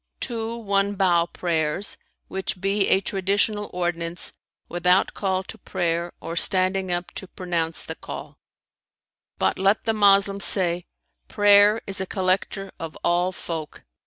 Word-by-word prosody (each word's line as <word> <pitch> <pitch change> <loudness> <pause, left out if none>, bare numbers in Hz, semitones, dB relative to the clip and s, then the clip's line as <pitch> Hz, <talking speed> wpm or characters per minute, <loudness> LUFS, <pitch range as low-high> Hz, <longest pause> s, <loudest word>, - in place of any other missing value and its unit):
"Two 230 -1 -3
one 200 -2 0
bow 175 -3 +3
prayers, 165 +2 -1 0.3
which 190 -1 -4
be 195 +1 +1
a 190 - +3
traditional 200 +2 -1
ordinance, 175 -1 -2 0.3
without 180 +2 +2
call 190 -1 -1
to - - -10
prayer 170 0 -2
or 165 - -6
standing 185 +1 +3
up 175 0 -3
to 190 - -7
pronounce 170 -3 -2
the - - -5
call;[FN#318] - - -9 1.0
but - - 0
let 195 +3 +2
the 225 - +1
Moslem 200 -1 +4
say, 180 -3 +1 0.4
'Prayer 205 +1 +5
is 195 -1 -1
a 190 - -3
collector 190 +1 -1
of 165 -1 -7
all 175 +2 +2
folk!' 165 -4 -7
190 Hz, 135 wpm, -24 LUFS, 175-200 Hz, 1.0 s, Prayer